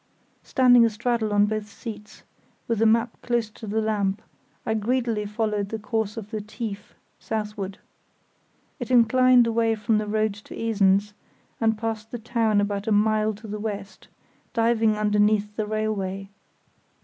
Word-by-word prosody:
Standing 245 -2 +5
astraddle 230 0 0
on 205 0 +4
both 215 0 -3
seats, 215 -2 -9 0.4
with 230 -2 0
the 225 - +4
map 230 +1 +1
close 235 -3 -1
to 220 - -10
the 215 +2 0
lamp, 210 -2 -1 0.4
I 220 - 0
greedily 225 -1 0
followed 210 -1 -1
the 225 - -3
course 220 -1 -2
of 210 -1 -7
the 215 -2 -3
"tief" 210 -1 -7 0.2
southward. 210 -3 -4 1.0
It 245 - -5
inclined 250 +1 +5
away 230 0 +1
from 215 0 +1
the 210 - -3
road 215 0 +1
to - - -9
Esens 205 -2 +2 0.5
and 225 -1 +2
passed 220 0 -4
the 240 - -5
town 225 -2 +1
about 205 0 -1
a - - +1
mile 215 0 +2
to 215 +2 -11
the 210 0 -5
west, 205 -2 -6 0.5
diving 225 -2 +2
underneath 210 0 +2
the 215 -1 -2
railway. 200 -3 -2
215 Hz, 150 wpm, -25 LUFS, 210-225 Hz, 1.0 s, Standing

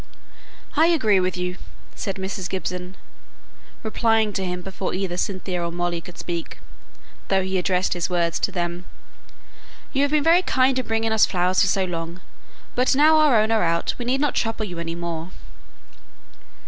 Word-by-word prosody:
"I 320 +2 +5
agree 220 - +3
with 185 0 -1
you," 180 0 -3 0.4
said 195 - -4
Mrs. 190 -1 -4
Gibson, 180 -1 -4 0.9
replying 220 -1 +2
to 195 - -2
him 180 -1 -3
before 190 0 -4
either 185 -2 -2
Cynthia 185 -1 -2
or 170 - -2
Molly 175 0 -2
could 180 - -12
speak, 170 -2 -5 0.7
though 190 -1 +2
he 190 0 -1
addressed 180 0 +1
his 175 0 -2
words 170 -2 0
to - - 0
them. 175 -1 -3 1.1
"You 275 - +2
have 285 - +3
been 300 0 +2
very 335 +3 +5
kind 260 -6 +2
in 255 - -4
bringing 225 0 0
us 220 -1 +5
flowers 180 0 +1
so 195 -1 +3
long; 170 0 -5 0.5
but 255 +2 +2
now 310 +3 +6
our 295 -7 +5
own 215 +1 +2
are 225 -1 +3
out 170 0 +1
we 240 - -4
need 260 +3 +1
not 295 - +1
trouble 225 -1 -1
you 175 -4 -6
any 165 0 -4
more." 170 -1 -4
190 Hz, 175 wpm, -23 LUFS, 175-225 Hz, 1.1 s, now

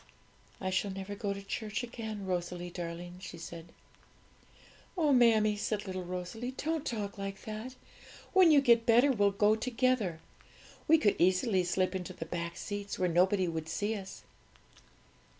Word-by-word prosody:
'I 185 - -2
shall 190 +2 0
never 195 +1 -5
go 205 0 -3
to 200 0 -5
church 215 +3 -3
again, 220 -4 -6
Rosalie 175 -1 -3
darling,' 175 0 -6
she 175 - -8
said. 165 0 -8 1.3
'Oh, 305 -4 +3
mammie,' 220 -4 +4
said 210 0 -2
little 185 -1 -4
Rosalie, 180 +7 -5
'don't 320 -1 -2
talk 205 -3 -4
like 195 0 -5
that! 220 +4 -6 0.6
When 375 -3 +7
you 295 -3 +6
get 235 -3 +4
better, 240 +5 +6
we'll 205 -5 +3
go 205 +2 +3
together. 230 -6 0 0.7
We 320 - +7
could 210 -9 +2
easily 185 +2 +3
slip 185 +1 0
into 185 -2 -4
the 165 - -6
back 170 0 -4
seats, 205 -1 -5
where 180 -1 +1
nobody 185 +2 +3
would 160 -1 -4
see 205 +6 -1
us.' 195 -2 -8
200 Hz, 155 wpm, -31 LUFS, 180-230 Hz, 1.3 s, When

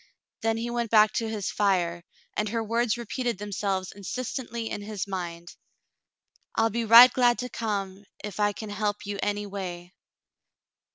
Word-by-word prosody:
Then 225 0 +1
he 235 +1 -3
went 235 -1 -1
back 215 -1 +5
to 225 -1 -1
his 210 -3 -3
fire, 180 -4 +1 0.3
and 210 0 -1
her 225 +1 -1
words 230 +1 0
repeated 240 -1 -3
themselves 195 -2 -2
insistently 235 +2 -5
in 205 - -4
his 205 -1 -4
mind 175 -3 -6 0.5
— - - -43
"I'll 225 0 +2
be 230 +2 -1
right 235 +3 +10
glad 245 -2 +4
to 250 - -4
come, 200 -4 -3 0.2
if 210 -1 -6
I 205 0 +3
can 210 +1 -7
help 205 0 -2
you 200 0 -4
anyway." 195 -4 -4
210 Hz, 160 wpm, -27 LUFS, 195-230 Hz, 0.5 s, right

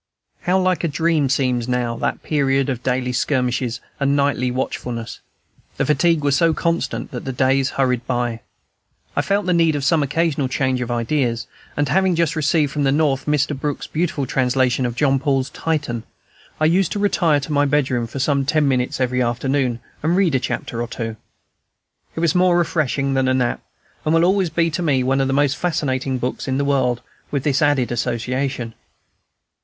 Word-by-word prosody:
How 180 +1 +2
like 185 -4 +1
a - - +2
dream 160 -1 +1
seems 125 -3 0
now 125 -2 -1
that - - -2
period 135 -2 +1
of 125 -3 -2
daily 125 -1 -1
skirmishes 125 -2 0 0.2
and 140 0 +2
nightly 140 -3 +1
watchfulness! 125 -2 -4 0.6
The - - +1
fatigue 150 +1 +2
was 140 -2 +2
so 165 -1 +3
constant 165 -9 -2
that 125 - -6
the 135 - -3
days 130 +1 +2
hurried 125 -3 +1
by. 120 -2 -1 0.8
I - - +2
felt 200 0 0
the 180 - +2
need 165 -2 +3
of 145 - -2
some 155 +3 +3
occasional 145 -1 0
change 130 -1 0
of 125 - -3
ideas, 120 0 0 0.3
and 145 0 +1
having 185 +5 +2
just 165 -2 +1
received 155 -1 +1
from 150 - -1
the 135 - +3
North 140 -2 +1
Mr. 150 0 +1
Brook's 145 +1 -3
beautiful 155 -4 -1
translation 130 0 +1
of 120 - -5
Jean 135 0 +2
Paul's 135 -2 0
"Titan," 145 -8 -2 0.6
I 155 - +2
used 175 +2 +3
to - - -3
retire 175 -7 +2
to 145 +2 -5
my 145 0 +3
bedroom 130 -5 +1
for 120 - -8
some 140 +1 +1
ten 150 +1 +2
minutes 125 -2 0
every 125 0 +1
afternoon, 125 0 0 0.2
and 160 +3 +1
read 185 -6 +3
a 130 - +3
chapter 120 -1 -3
or 120 - -2
two. 115 -1 -5 1.0
It 165 - -3
was 170 -3 +2
more 180 -1 +4
refreshing 145 -5 0
than 130 -1 +1
a 130 - +2
nap, 125 -2 0 0.4
and 155 +1 +2
will 165 +1 +4
always 190 -1 +2
be 165 +1 +1
to 180 +3 -2
me 140 -6 +2
one 135 +1 +1
of 135 - +1
the - - 0
most 145 +1 +2
fascinating 135 -6 -1
books 125 +2 -3
in 130 0 0
the 140 - 0
world, 130 -4 +1 0.3
with 140 -3 -2
this 140 -3 +1
added 145 -5 +2
association. 125 +1 -2
135 Hz, 190 wpm, -20 LUFS, 125-155 Hz, 1.0 s, more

